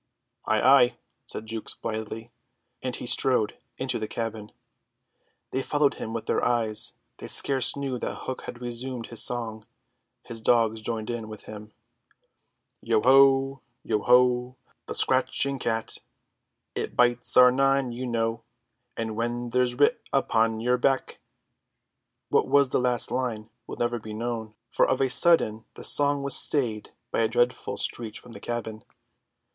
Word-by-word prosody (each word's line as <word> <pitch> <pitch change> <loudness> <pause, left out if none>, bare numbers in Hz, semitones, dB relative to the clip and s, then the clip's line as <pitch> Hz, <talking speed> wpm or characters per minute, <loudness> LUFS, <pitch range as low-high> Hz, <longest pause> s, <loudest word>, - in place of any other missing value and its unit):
"Ay, 110 - +2
ay," 130 -1 +5 0.3
said 110 - -4
Jukes 110 0 -2
blithely, 110 +1 -6 0.5
and 130 -1 -2
he - - -4
strode 120 -3 +3 0.2
into 130 -2 -2
the 110 - -4
cabin. 110 -2 -5 1.0
They 130 - -1
followed 145 0 +1
him 110 - -4
with 115 0 -4
their - - 0
eyes; 115 -3 0 0.2
they - - -8
scarce 135 -3 +3
knew 135 -3 -3
that - - -4
Hook 130 - -5
had 120 - -8
resumed 120 0 -4
his 115 - 0
song, 115 -3 -2 0.6
his 115 -2 -7
dogs 110 -1 +2
joining 115 +1 -3
in 115 -2 -7
with 110 -1 -9
him: 105 0 -10 1.1
"Yo 115 -1 +1
ho, 135 +1 +5 0.2
yo 105 - 0
ho, 125 +1 +3 0.3
the - - -5
scratching 135 +1 +2
cat, 115 -2 -2 0.7
Its - - -4
tails 120 0 +3
are 125 0 +8
nine, 135 0 +1
you 125 +2 -5
know, 115 -1 -1 0.6
And 110 -1 -3
when 120 +1 -3
they're 125 0 +2
writ 145 - +3
upon 115 -4 +1
your 125 +1 +1
back—" 135 +1 0 1.1
What - - +2
was 140 0 +4
the - - +1
last 125 -1 0
line 115 -4 -3 0.2
will - - -7
never 120 0 -1
be 110 -1 -8
known, 110 -1 -4 0.2
for - - +3
of 130 - +1
a 135 -2 +2
sudden 120 -8 +3
the - - -10
song 145 -1 +3
was 140 -2 +3
stayed 115 -8 0 0.2
by - - -1
a 115 - +3
dreadful 120 +2 0
screech 115 -2 -2
from 125 - -15
the - - -10
cabin. 110 -2 -5
120 Hz, 155 wpm, -26 LUFS, 110-130 Hz, 1.1 s, are